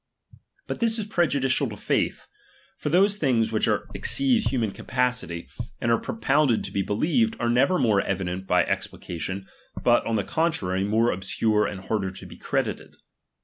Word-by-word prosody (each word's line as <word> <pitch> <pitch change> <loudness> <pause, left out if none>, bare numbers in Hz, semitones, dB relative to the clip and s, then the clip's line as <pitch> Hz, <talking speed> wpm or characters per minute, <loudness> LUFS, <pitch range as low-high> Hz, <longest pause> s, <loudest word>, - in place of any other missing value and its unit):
But - - -5
this 230 -1 +2
is 215 - -3
prejudicial 145 - +1
to - - -8
faith; - - -1 0.5
for 150 - -2
those 195 +5 +4
things 120 - +1
which 110 +1 +1 0.2
exceed 245 - +1
human 115 -6 0
capa 125 +4 0
city, 85 -9 -6 0.3
and 120 - 0
are 115 - +3
propounded 130 +2 +1
to - - -6
be 100 - 0
believed, 170 - +1
are 120 0 +1
never 135 +9 +3
more 105 - +3
evident 95 -1 -3
by 90 -1 +4
explication, 95 +3 -4 0.4
but, - - +4
on 115 - 0
the 105 - +1
contrary, 155 - 0
more 110 +4 +2
obscure 105 +3 +1
and 95 -2 -6
harder 95 -1 -1
to 95 - -10
be - - -11
credited. - - -3
115 Hz, 165 wpm, -25 LUFS, 100-155 Hz, 0.5 s, those